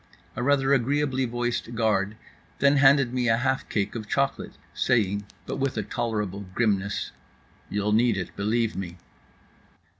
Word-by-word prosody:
A - - -3
rather 135 +1 +3
agreeably 135 +1 +1
voiced 120 0 -2
guard 110 -2 +1 0.4
then 140 +1 +4
handed 135 -2 +5
me 125 -2 +1
a 115 - +4
half 130 +2 -1
cake 100 -1 -1
of 110 -3 -6
chocolate, 140 0 -1 0.2
saying 100 -4 +1 0.2
(but - - -4
with 135 -3 -1
a 110 - 0
tolerable 105 -3 -3
grimness): 100 -4 0 0.6
"You'll 105 +1 -1
need 115 0 +3
it, 95 - -5
believe 110 +2 0
me." 90 -2 -5
115 Hz, 145 wpm, -26 LUFS, 105-130 Hz, 0.6 s, handed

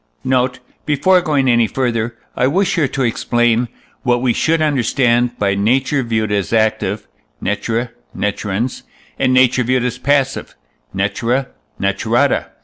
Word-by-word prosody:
Note. 125 -1 +1 0.3
Before 180 +6 +3
going 145 -5 +1
any 120 -2 +4
further, 120 -2 -2 0.2
I 125 - +2
wish 190 +8 +1
here 160 -6 +2
to 135 0 -2
explain, 120 0 +1 0.3
what 120 -1 +1
we 125 -1 +1
should 165 +5 +1
understand 125 -4 +1
by 100 -1 +1
nature 130 +7 +1
viewed 110 -3 -1
as 100 -3 -1
active 110 -2 0 0.3
(natura 115 +4 -2 0.3
naturans), 105 +3 -2 0.4
and 130 - +2
nature 130 0 +4
viewed 125 +1 +1
as 125 0 -3
passive 135 0 0 0.4
(natura 115 +7 -1 0.3
naturata). 110 +7 +1
120 Hz, 135 wpm, -17 LUFS, 115-130 Hz, 0.4 s, any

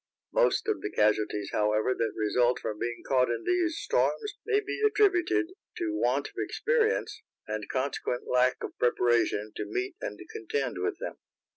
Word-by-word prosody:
Most - - +3
of 430 - 0
the - - -3
casualties, 105 -1 +1
however, 105 +3 +2
that 115 -2 -1
result 120 +3 +2
from 105 -1 -4
being 120 0 -3
caught 130 -2 +3
in 120 - -2
these 350 -2 +1
storms 425 -2 0
may 420 -2 +3
be 400 0 -4
attributed 390 -4 +3 0.3
to 345 -2 -1
want 320 - +1
of - - -22
experience, 465 -1 0 0.3
and 110 -1 -4
consequent 130 -2 -2
lack 125 0 +2
of - - -5
preparation 120 -3 +2
to 105 - -3
meet 125 +5 -3
and 105 - -5
contend 125 +1 -2
with 90 - -1
them. - - -6
125 Hz, 160 wpm, -29 LUFS, -, 0.3 s, Most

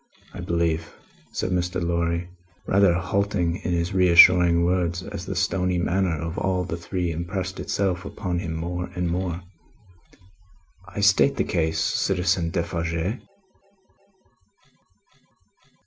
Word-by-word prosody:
I - - -8
believe," 80 -2 -1 0.4
said 95 - -2
Mr. 90 0 -1
Lorry, 85 0 -1 0.4
rather 95 -3 +4
halting 95 -2 0
in - - -4
his 85 +2 -1
reassuring 90 -1 +6
words, 90 -1 0
as 90 +1 -7
the 95 - -3
stony 90 0 0
manner 90 -1 0
of 80 +2 -4
all 90 -1 0
the 90 -2 -4
three 85 0 -3
impressed 90 +3 -4
itself 95 -2 -1
upon 90 -3 -3
him 80 -2 -4
more 90 +2 -4
and 90 -1 -1
more, 90 0 -2 1.4
"I 100 +2 -5
state 100 +7 +4
the - - +2
case, 80 -2 -1
Citizen 90 -1 +1
Defarge?" 85 +3 -2
90 Hz, 120 wpm, -24 LUFS, 85-95 Hz, 1.4 s, reassuring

